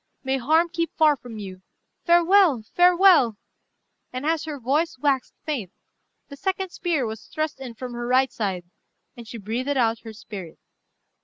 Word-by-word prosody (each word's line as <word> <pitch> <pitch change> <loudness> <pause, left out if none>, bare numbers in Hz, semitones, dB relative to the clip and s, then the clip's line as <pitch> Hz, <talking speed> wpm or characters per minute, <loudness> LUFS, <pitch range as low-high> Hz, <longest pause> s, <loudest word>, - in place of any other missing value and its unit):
May 265 0 0
harm 315 +7 +3
keep 335 -1 -2
far 305 -2 +5
from 245 -4 -11
you. 190 -3 -8 0.4
Farewell! 345 - +4
farewell!" 355 - +5 0.7
and 255 +3 -5
as 320 0 0
her 300 -3 -6
voice 280 +6 0
waxed 270 -1 0
faint, 255 - -3 0.6
the 280 - -10
second 380 +3 -2
spear 330 -9 -1
was 220 -1 -7
thrust 310 -2 -3
in 250 -3 -8
from 250 +1 -7
her 240 0 -4
right 260 +1 +3
side, 190 -5 -2 0.5
and 235 -2 -11
she 235 - -7
breathed 230 +6 -3
out 230 -2 +2
her 225 -1 -10
spirit. 195 -6 -9
265 Hz, 160 wpm, -24 LUFS, 230-325 Hz, 0.7 s, far